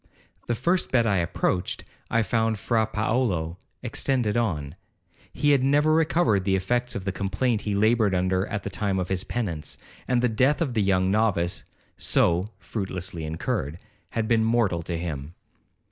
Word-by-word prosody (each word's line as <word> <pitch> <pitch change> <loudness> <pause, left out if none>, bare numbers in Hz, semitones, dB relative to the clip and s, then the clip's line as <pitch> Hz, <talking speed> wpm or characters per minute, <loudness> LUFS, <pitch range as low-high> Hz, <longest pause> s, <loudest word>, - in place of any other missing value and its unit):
The 120 - +1
first 175 +10 0
bed 120 -3 +3
I 100 -3 +2
approached, 90 +1 -1 0.3
I 115 0 +2
found 110 0 +1
Fra 110 +1 +1
Paolo 105 -7 -1 0.2
extended 120 -2 0
on. 80 -12 -1 0.6
He 145 - +2
had 135 -3 +4
never 145 +3 +4
recovered 155 - +3
the 95 0 +2
effects 120 +6 0
of 95 - -4
the 95 - 0
complaint 105 +5 0
he 100 - 0
laboured 110 -1 +3
under 95 +1 +1
at 105 -1 -4
the 100 - -4
time 95 +1 -1
of 90 -1 -2
his 95 -1 -1
penance; 85 -11 -3 0.3
and 125 -1 +2
the - - +5
death 130 +6 +2
of 150 -7 -1
the 110 - +1
young 95 -1 +2
novice 100 -5 +1 0.3
so 90 +4 +2
(fruitlessly 95 -5 -5
incurred) 80 -1 -2 0.3
had 115 -1 -2
been 115 -1 +3
mortal 110 -7 +2
to 85 0 -4
him. 80 -2 -5
105 Hz, 165 wpm, -25 LUFS, 90-120 Hz, 0.6 s, the